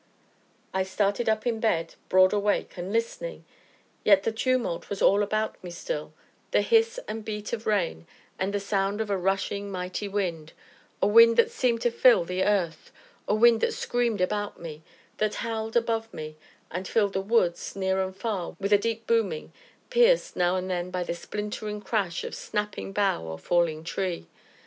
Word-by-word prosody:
I 190 - +1
started 200 +4 0
up 220 0 0
in 230 -2 0
bed, 170 -7 0 0.2
broad 185 +1 +5
awake, 205 0 0
and 180 +2 -5
listening; 230 - -3 0.6
yet 200 -2 +5
the 225 - 0
tumult 240 -5 -1
was 200 - -4
all 200 +2 +4
about 215 0 -1
me 180 - -6
still 335 - -5 0.4
the - - +3
hiss 460 +1 +3
and 220 0 -5
beat 210 0 -5
of 225 -1 -4
rain, 175 - 0 0.3
and 190 +1 0
the 205 - -1
sound 200 0 -1
of 220 -2 -2
a - - +2
rushing, 195 +2 -1
mighty 185 +2 -4
wind 175 -6 -3 0.5
a - - +6
wind 230 +2 +7
that 465 - +4
seemed 250 - +1
to 240 - +2
fill 235 -6 +5
the 180 +2 -2
earth 180 -6 0 0.4
a 210 - +2
wind 230 +1 +5
that - - +1
screamed 235 -5 0
about 205 +2 -1
me, 160 -2 -8 0.4
that 215 0 0
howled 225 0 -1
above 225 -1 0
me, 155 0 -7 0.4
and 185 +3 -4
filled 205 -3 +1
the 190 - 0
woods, 195 -5 +1
near 190 -1 0
and 190 0 -3
far, 195 -5 -3
with 200 +1 +1
a 205 - +6
deep 225 +1 -2
booming, 220 -9 0 0.4
pierced, - - +4
now 180 0 +2
and 185 0 -2
then, 180 -1 -2
by 180 -1 -2
the 170 - -3
splintering 210 +3 -5
crash 200 -5 -1
of - - -6
snapping 210 -2 -4
bough 195 - +1
or 80 0 -6
falling 160 - +1
tree. 180 - -3
205 Hz, 180 wpm, -27 LUFS, 185-225 Hz, 0.6 s, wind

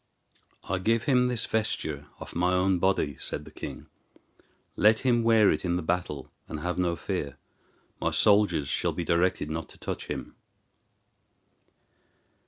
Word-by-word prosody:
"I 95 0 -2
give 115 +4 +1
him 125 -4 +3
this 125 -4 -1
vesture 80 -9 -2
off - - -9
my 90 +2 +2
own 90 0 +2
body," 85 -7 +1
said 75 - -5
the 75 - -12
king; - - -7 0.9
"let 110 +2 +4
him 120 -2 +3
wear 115 -3 +5
it 75 - -1
in 85 -2 0
the 90 - -1
battle, 80 -5 -2 0.2
and 75 - -6
have 90 +2 -2
no 85 -2 +1
fear. - - -4 0.6
My - - +2
soldiers 100 -8 +3
shall - - 0
be 85 - -3
directed 85 -2 +1
not 80 0 -4
to - - -14
touch - - -5
him." - - -5
90 Hz, 155 wpm, -28 LUFS, 80-110 Hz, 0.9 s, wear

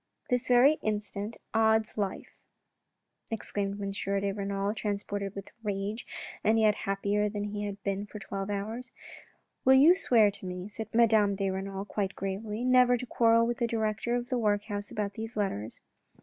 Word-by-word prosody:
" - - -41
This 250 0 +1
very 255 +5 +5
instant, 210 0 -3 0.2
odds 220 -1 +3
life,' 200 -3 -3 0.5
' - - -33
exclaimed 205 -2 -3
M. 200 -1 -3
de 195 0 -1
Renal, 200 0 -2
transported 200 -1 -3
with 200 -1 -7
rage 205 +1 -3 0.4
and 220 +1 +4
yet 215 -1 +5
happier 205 +1 0
than 205 0 -3
he 205 0 -3
had 200 -1 -6
been 200 +1 -2
for 210 - -9
twelve 195 -1 -5
hours. 220 +5 -4 0.7
"Will 265 - +7
you 295 +6 +8
swear 230 - +4
to 195 -1 -6
me," 180 +1 -5
said 220 +1 -6
Madame 220 -3 +4
de 195 -1 -1
Renal 195 +1 -4
quite 200 -2 -2
gravely, 210 +3 -4
" - - -1
never 250 -1 +5
to 250 - -5
quarrel 230 -1 +4
with 240 0 -2
the 235 - +1
director 225 +1 -1
of 245 +1 -3
the 250 -3 0
workhouse 205 -1 -1
about 205 -1 -3
these 220 +2 -6
letters 115 - -2
210 Hz, 180 wpm, -29 LUFS, 200-225 Hz, 0.7 s, you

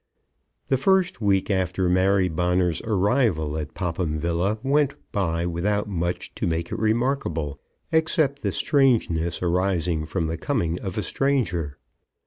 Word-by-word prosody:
The 135 - +3
first 190 +2 +2
week 100 -1 +2
after 95 -1 0
Mary 95 +1 +3
Bonner's 90 0 0
arrival 100 - +1
at 75 -1 -5
Popham 85 -3 -2
Villa 85 +6 0
went 140 +1 +2 0.2
by 85 -4 0
without 100 +5 -1
much 90 -3 -3
to - - -2
make 85 0 -2
it - - -3
remarkable, 110 - 0 0.3
except 160 -3 +1
the - - -1
strangeness 110 - +1
arising 85 -3 0
from 85 0 -1
the 80 +1 -3
coming 85 - -1
of 95 0 -5
a 105 - 0
stranger. 90 - -1
90 Hz, 135 wpm, -24 LUFS, 85-115 Hz, 0.3 s, The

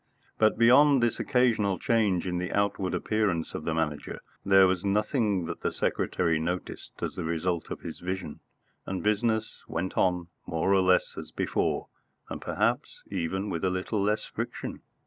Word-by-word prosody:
But, 110 -1 +4
beyond 130 +3 +6
this 120 - +1
occasional 115 -7 +2
change 105 -4 +1
in 90 -1 -1
the 90 0 -3
outward 100 -2 0
appearance 100 -7 0
of 75 - -5
the 85 - 0
Manager, 75 -3 -2 0.2
there 95 -1 +6
was 90 0 +1
nothing 105 - +1
that 85 0 -6
the - - 0
secretary 85 -3 0
noticed 90 +3 -4
as - - -2
the - - -4
result 85 +1 -1
of - - -6
his 80 - -7
vision, 90 -4 -4 0.5
and 95 -1 -3
business 110 +1 0
went 90 +3 -3
on 90 -2 +1 0.2
more 85 +4 +1
or 95 - +5
less 90 0 +3
as - - -8
before, - - -1 0.4
and - - -5
perhaps - - -1
even 95 +2 -2
with 85 - -3
a 95 - +3
little 95 +3 -1
less 105 +2 +1
friction. - - -5
95 Hz, 165 wpm, -28 LUFS, 90-105 Hz, 0.5 s, beyond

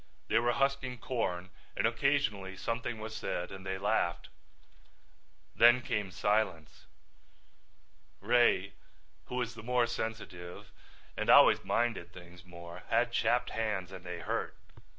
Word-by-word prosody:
They 115 - +4
were 120 +1 +1
husking 135 -2 0
corn 95 -7 -3 0.3
and - - +2
occasionally 110 -6 0
something 115 +4 -3
was 110 0 -7
said 90 - -3
and 95 -1 -9
they 95 0 -3
laughed. 95 -3 0 1.3
Then 120 +2 +6
came 105 -4 -2
silence. 95 -5 -1 1.3
Ray, 100 -5 +3 0.5
who - - -6
was 120 -2 -2
the 115 - -10
more 125 +1 +2
sensitive 110 -7 -6 0.4
and - - -3
always - - +7
minded 115 -8 -1
things 90 -1 -13
more, 85 0 -10
had 120 0 +2
chapped 120 +1 +1
hands 105 -5 -2
and 95 -2 -9
they - - -6
hurt. - - -3
110 Hz, 130 wpm, -32 LUFS, 95-120 Hz, 1.3 s, always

